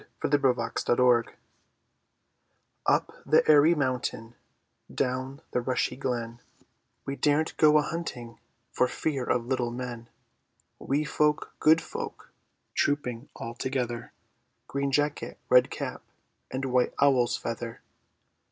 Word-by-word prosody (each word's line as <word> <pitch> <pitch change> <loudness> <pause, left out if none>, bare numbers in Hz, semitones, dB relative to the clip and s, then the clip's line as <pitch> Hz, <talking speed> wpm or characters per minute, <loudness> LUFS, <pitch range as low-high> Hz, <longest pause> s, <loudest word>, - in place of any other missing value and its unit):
FAIRY 145 0 +1
LAND 115 -1 -4
THE - - +2
FAIRIES 125 -2 +4 1.6
Up - - +2
the - - +3
airy 155 +2 +6
mountain, 125 -5 -2 0.6
Down 130 +1 -2
the 125 - 0
rushy 125 -1 -1
glen, 120 -3 -3 0.7
We 135 - -3
daren't 150 +2 +1
go 155 -1 +6
a 150 - +3
hunting 130 -8 -5 0.3
For 125 - +2
fear 135 +1 -2
of 120 -2 0
little 125 -1 0
men; 120 -1 -6 0.7
Wee 145 +3 0
folk, 150 +2 +1
good 160 +1 +5
folk, - - -7 0.4
Trooping 135 -3 -1
all 115 - -6
together; 120 -1 -3 0.6
Green 140 0 -1
jacket, 145 +1 -1
red 125 0 +6
cap, - - -5 0.5
And 130 +1 -3
white 125 -1 +1
owl's 130 -4 +3
feather! 115 0 -5
130 Hz, 120 wpm, -28 LUFS, 120-145 Hz, 1.6 s, airy